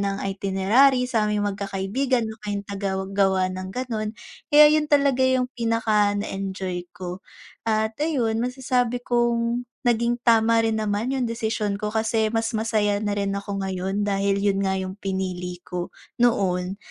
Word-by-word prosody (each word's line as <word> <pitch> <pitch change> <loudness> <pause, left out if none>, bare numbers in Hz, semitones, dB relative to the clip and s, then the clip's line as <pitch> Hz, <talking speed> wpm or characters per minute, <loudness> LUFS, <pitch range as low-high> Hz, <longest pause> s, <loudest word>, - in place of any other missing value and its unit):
ng 200 0 -2
itinerary 210 +8 +3
saming 210 -3 0
mag-kakaibigan, 205 +5 -1
ako 220 0 -9
'yung 200 0 -3
tagagawa 195 -1 0
ng 185 0 -6
ganon. 225 -3 -3 0.4
Eh 300 0 +9
'yun 305 -1 +2
talaga 280 -3 +3
'yung 260 -1 +3
pinaka 220 -3 +1
na 205 - -2
enjoy 190 -2 -4
ko 180 0 -6 0.5
at 220 0 +1
ayun 245 -8 0
masasabi 250 -1 0
kong 240 0 0 0.2
naging 235 +1 +2
tama 230 0 +5
rin 225 -1 +1
naman 215 +4 -1
'yung 255 -2 0
desisyon 220 -3 -2
ko. 210 - -2
Kasi 220 0 +1
mas 225 0 0
masaya 215 -2 +1
na 205 -1 -1
rin 200 -1 -1
ako 200 0 -4
ngayon 190 +2 -2
dahil 200 0 +1
yun 200 -1 +2
nga 190 -1 +1
yung 190 0 -3
pinili 185 -2 -3
ko 180 -1 -4 0.3
noon. 190 -5 +1
210 Hz, 150 wpm, -24 LUFS, 195-235 Hz, 0.5 s, Eh